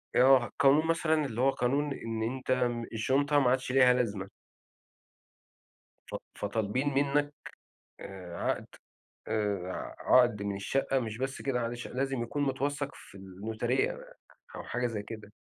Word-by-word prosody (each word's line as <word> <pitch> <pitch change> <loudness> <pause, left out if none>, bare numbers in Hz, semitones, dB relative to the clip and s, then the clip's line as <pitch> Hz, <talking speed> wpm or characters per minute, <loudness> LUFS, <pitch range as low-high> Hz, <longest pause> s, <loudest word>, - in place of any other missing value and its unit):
آه، 125 -3 +5
قانون 150 +2 +5
مثلًا 160 -2 +2
اللي 120 -2 -3
هو 135 - +5
قانون 140 +3 0
إن 115 -3 -4
أنت 130 +3 -3 0.4
الشنطة 140 +6 +2
ما 130 - +3
عادش 130 0 0
ليها 130 -1 +6
لازمة. 105 -6 -1 1.8
ف - - -3 0.2
فطالبين 110 +7 -1
منك، 145 +1 +1 0.7
آآ، 90 -3 -8
عقد، - - -1 0.6
آآ 100 -4 -1
ع - - -6 0.3
عقد 115 -5 0
من 100 -1 -2
الشقة، 135 +7 0
مش 110 -3 -4
بس 135 +2 -3
كده، 135 -3 0
معلش، 120 +1 -4
لازم 135 -1 -2
يكون 145 +5 -2
متوثق 140 +1 -1
في 100 - -14
الnotary 105 - -1 0.6
أو - - -6
حاجة 125 0 -1
زي 110 -3 -4
كده. 105 -1 -9
125 Hz, 140 wpm, -30 LUFS, 110-135 Hz, 1.8 s, ليها